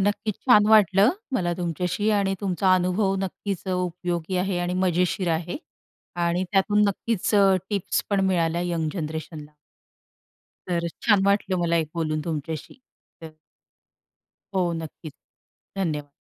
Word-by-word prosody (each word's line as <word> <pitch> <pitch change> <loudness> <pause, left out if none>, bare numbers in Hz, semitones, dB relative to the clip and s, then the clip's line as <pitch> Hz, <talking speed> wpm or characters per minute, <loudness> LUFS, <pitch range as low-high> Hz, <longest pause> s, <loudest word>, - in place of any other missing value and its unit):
नक्कीच 205 +1 0
छान 210 -5 +6
वाटलं, 210 0 +5 0.2
मला 175 -8 0
तुमच्याशी 180 +4 -1
आणि 195 -1 0
तुमचा 190 -1 +1
अनुभव 185 +2 +1
नक्कीच 195 0 -4
उपयोगी 180 -1 -2
आहे 180 0 0
आणि 175 0 -1
मजेशीर 180 0 +1
आहे 165 +2 -3 0.7
आणि 175 +2 0
त्यातून 205 +1 +3
नक्कीच 210 +1 -1
अ, 195 -2 +5 0.2
टिप्स 200 -3 0
पण 200 -1 +2
मिळाल्या 170 -2 +1
यंग 160 -2 -1
जनरेशनला. 155 -2 -6 1.2
तर 170 -1 0
छान 205 -4 +4
वाटलं 200 -1 +2
मला 170 -1 +1
एक 160 -2 0
बोलून 155 -2 -1
तुमच्याशी. 160 - -5 0.4
तर 160 -1 -9 1.2
हो, 180 -2 +1
नक्कीच. 155 -1 -9 0.6
धन्यवाद. 150 -6 -2
180 Hz, 125 wpm, -24 LUFS, 170-195 Hz, 1.2 s, छान